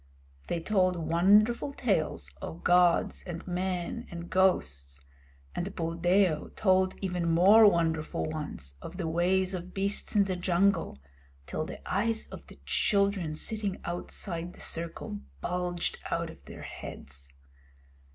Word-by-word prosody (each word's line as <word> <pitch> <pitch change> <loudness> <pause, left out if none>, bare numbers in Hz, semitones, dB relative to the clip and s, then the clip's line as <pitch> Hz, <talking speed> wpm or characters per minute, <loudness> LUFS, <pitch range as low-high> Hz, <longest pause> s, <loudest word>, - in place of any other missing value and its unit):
They 170 - -1
told 185 0 +2
wonderful 205 - +3
tales 160 - -1
of 80 +2 -7
gods 175 -1 +4
and 175 0 -6
men 180 +5 -2
and 170 0 -8
ghosts; 70 - +1 0.5
and 190 +3 -4
Buldeo 170 0 +2
told 185 -2 +3
even 180 -3 0
more 200 +6 +8
wonderful 160 -3 0
ones 145 - -5
of 180 - -8
the 175 -4 -2
ways 185 +3 +2
of 180 0 -6
beasts 200 +3 -1
in 205 - +6
the 190 -1 -2
jungle, 180 - +1 0.5
till 155 - -3
the - - -9
eyes 220 +4 +1
of - - -10
the - - -14
children 200 -6 +1
sitting 205 +2 -3
outside 175 0 -4
the - - -15
circle 165 -10 -3 0.2
bulged 180 - -2
out - - -1
of - - -17
their - - -9
heads. 70 0 -7
180 Hz, 130 wpm, -29 LUFS, 165-195 Hz, 0.5 s, more